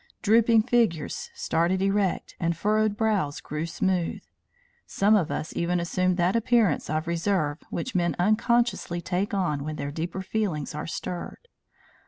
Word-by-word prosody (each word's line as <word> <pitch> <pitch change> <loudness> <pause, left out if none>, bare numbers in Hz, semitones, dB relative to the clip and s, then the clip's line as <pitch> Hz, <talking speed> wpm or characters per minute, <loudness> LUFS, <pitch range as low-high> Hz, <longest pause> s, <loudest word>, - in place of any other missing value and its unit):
Drooping 225 +1 +5
figures 215 -11 0
started 170 +3 +1
erect 195 -1 0
and 170 -1 0
furrowed 215 +1 +1
brows 205 -10 0
grew 155 +2 -4
smooth. 180 0 -1 0.6
Some 205 +2 +3
of 175 -6 +1
us 155 - -4
even 175 +1 0
assumed 185 +2 0
that 180 +3 +2
appearance 230 -6 +2
of 155 +1 -1
reserve 170 -3 0
which 250 +9 -4
men 175 -2 +1
unconsciously 215 -1 +1
take 185 +4 -2
on 150 -7 0
when 155 +1 -4
their 140 -1 -4
deeper 170 +5 -4
feelings 185 -9 -2
are 150 - -5
stirred. 180 - -6
180 Hz, 145 wpm, -26 LUFS, 165-210 Hz, 0.6 s, Drooping